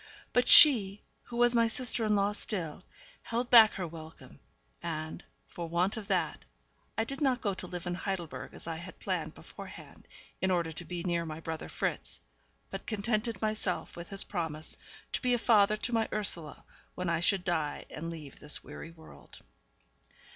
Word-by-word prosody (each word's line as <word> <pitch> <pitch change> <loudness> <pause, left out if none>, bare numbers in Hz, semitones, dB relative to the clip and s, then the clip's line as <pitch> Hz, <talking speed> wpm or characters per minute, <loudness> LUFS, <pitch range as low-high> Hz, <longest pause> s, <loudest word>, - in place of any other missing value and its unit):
But 245 0 +3
she, 210 -9 +9 0.2
who 235 - -7
was 240 0 +5
my 230 -1 +4
sister 245 0 +2
in 210 -1 +2
law 200 0 +2
still, 180 -7 -3 0.4
held 235 +1 -3
back 225 -3 +9
her 185 - -3
welcome, 160 0 -12 0.4
and, 155 -1 -5 0.2
for 170 -1 -6
want 180 +5 +1
of 220 -3 -7
that, - - 0 0.6
I 225 - +2
did 275 +5 -6
not 260 -3 +2
go 200 -4 -1
to 185 - -5
live 180 0 -6
in 175 - -2
Heidelberg 180 -2 -5
as - - -7
I 165 -1 -4
had 170 +2 -10
planned - - -3
beforehand, - - -12 0.3
in 190 - +2
order 170 -3 +1
to 165 +2 -7
be 175 -1 -5
near 170 -2 0
my 155 -1 -6
brother 160 -1 -5
Fritz, - - -3 0.5
but - - -6
contented 215 0 -1
myself 215 -4 -2
with 170 +2 -8
his 195 -1 -1
promise 160 -5 -1 0.4
to - - -2
be 250 -1 +3
a - - +1
father 215 -3 +4
to 240 +3 -3
my 225 -1 +1
Ursula 175 -8 -3 0.3
when 180 0 -3
I 170 -1 +1
should 180 +2 +2
die 160 -5 -1
and 165 +3 -5
leave 155 -5 -9
this 150 - -3
weary - - -9
world. 160 - -15
185 Hz, 180 wpm, -31 LUFS, 165-220 Hz, 0.6 s, she